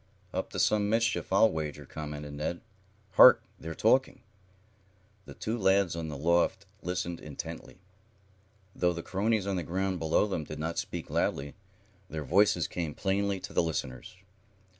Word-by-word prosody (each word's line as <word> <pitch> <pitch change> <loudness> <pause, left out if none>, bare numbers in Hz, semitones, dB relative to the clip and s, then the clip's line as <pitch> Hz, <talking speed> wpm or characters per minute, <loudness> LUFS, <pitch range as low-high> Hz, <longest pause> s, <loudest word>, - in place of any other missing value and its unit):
"Up - - -2
to - - -7
some 105 -1 +2
mischief, 115 -1 0
I'll 100 +3 +5
wager," 75 -2 -4
commented 75 0 -7
Ned. 75 +4 -3 0.5
"Hark! - - +8 0.2
They're 80 0 -6
talking." 130 +4 +2 1.0
The - - -11
two 110 - -3
lads 95 -3 +3
on 85 -1 -4
the 75 -2 -5
loft 85 +5 +1 0.2
listened 85 -1 -3
intently. 75 -2 -8 1.0
Though 90 0 +2
the 85 0 -6
cronies 105 +1 0
on 100 -1 -1
the - - -1
ground 95 +3 -2
below 80 +5 +2
them 95 -6 -2
did 75 +1 -8
not 80 +2 -2
speak - - -5
loudly, 70 +1 -1 0.6
their 80 -1 -4
voices 90 +2 +3
came 80 -4 -4
plainly 100 0 0
to - - -8
the - - +3
listeners. 80 -2 -4
85 Hz, 155 wpm, -29 LUFS, 75-100 Hz, 1.0 s, Hark